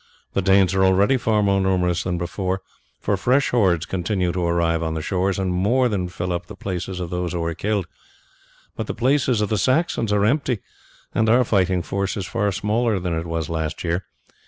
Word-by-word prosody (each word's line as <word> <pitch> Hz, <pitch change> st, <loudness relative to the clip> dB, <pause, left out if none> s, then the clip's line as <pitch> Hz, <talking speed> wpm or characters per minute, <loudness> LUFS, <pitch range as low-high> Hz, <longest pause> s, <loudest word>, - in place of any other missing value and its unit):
The 100 Hz, -, +1 dB
Danes 95 Hz, -1 st, +4 dB
are 95 Hz, 0 st, +3 dB
already 95 Hz, +7 st, +4 dB
far 110 Hz, -4 st, +1 dB
more 100 Hz, -1 st, +2 dB
numerous 90 Hz, -2 st, +1 dB
than 90 Hz, -1 st, -2 dB
before, 95 Hz, +2 st, -3 dB, 0.4 s
for 100 Hz, -, 0 dB
fresh 130 Hz, +8 st, +2 dB
hordes 95 Hz, -8 st, +2 dB
continue 90 Hz, 0 st, -1 dB
to 90 Hz, 0 st, -2 dB
arrive 85 Hz, -1 st, +1 dB
on 80 Hz, -1 st, -2 dB
the 80 Hz, -, -2 dB
shores, 95 Hz, +1 st, 0 dB
and 95 Hz, -2 st, -1 dB
more 120 Hz, +8 st, +2 dB
than 95 Hz, -5 st, -1 dB
fill 90 Hz, +1 st, -3 dB
up 85 Hz, -, -4 dB
the -, -, -9 dB
places 90 Hz, -1 st, -4 dB
of 85 Hz, -2 st, -5 dB
those 90 Hz, 0 st, -2 dB
who 85 Hz, -1 st, -2 dB
are 85 Hz, 0 st, -1 dB
killed; 100 Hz, +2 st, -1 dB, 0.9 s
but -, -, -4 dB
the -, -, -4 dB
places 130 Hz, -3 st, +2 dB
of 105 Hz, -, 0 dB
the 110 Hz, -, 0 dB
Saxons 130 Hz, -, +1 dB
are 105 Hz, 0 st, +3 dB
empty, 130 Hz, -1 st, +1 dB, 0.5 s
and 110 Hz, 0 st, +2 dB
our 125 Hz, +3 st, +5 dB
fighting 95 Hz, -5 st, +1 dB
force 100 Hz, +2 st, -2 dB
is 95 Hz, -, -3 dB
far 105 Hz, -2 st, 0 dB
smaller 110 Hz, +2 st, 0 dB
than 90 Hz, -2 st, -2 dB
it 80 Hz, +1 st, -3 dB
was 80 Hz, -2 st, -2 dB
last 80 Hz, -1 st, -3 dB
year. 85 Hz, +2 st, -1 dB
95 Hz, 205 wpm, -22 LUFS, 90-105 Hz, 0.9 s, our